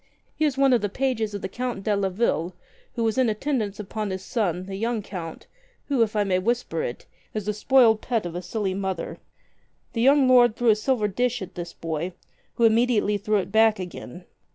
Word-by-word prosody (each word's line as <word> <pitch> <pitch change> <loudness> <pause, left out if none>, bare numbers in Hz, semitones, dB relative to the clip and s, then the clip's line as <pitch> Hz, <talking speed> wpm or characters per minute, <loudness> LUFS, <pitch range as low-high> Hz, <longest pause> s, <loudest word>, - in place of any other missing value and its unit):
He 310 - +1
is 280 -3 0
one 275 -1 +4
of 240 - +3
the 205 - -1
pages 225 -3 -1
of 200 - -6
the - - -1
Count 240 0 -4
de 210 0 +1
Leville, 190 -3 0 0.4
and 230 -2 0
was 225 +3 +1
in 255 -3 +3
attendance 215 -3 -2
upon 210 +1 -4
his 190 0 -4
son, 185 -6 -1
the 195 0 -6
young 225 +1 -1
Count, 170 -5 -7 0.4
who, 275 -4 +2
if 220 -1 +1
I 210 - +3
may 185 -2 +1
whisper 225 -5 -1
it, 120 - -5 0.3
is 215 -2 -2
the 210 - 0
spoiled 225 0 +4
pet 230 -6 -1
of 175 - -5
a 175 - -4
silly 190 +1 -2
mother. 190 -3 -4 0.7
The 230 - -1
young 275 +1 +5
lord 245 -3 +6
threw 240 -1 +2
a 215 - +6
silver 215 -1 0
dish 245 +2 -1
at 185 0 -10
this 175 -1 -6
boy 165 +2 -4 0.2
— - - -39
who 235 - 0
immediately 225 -2 +3
threw 210 +1 +1
it 190 -1 -3
back 220 0 +4
again. 180 0 -8
215 Hz, 215 wpm, -25 LUFS, 190-240 Hz, 0.7 s, lord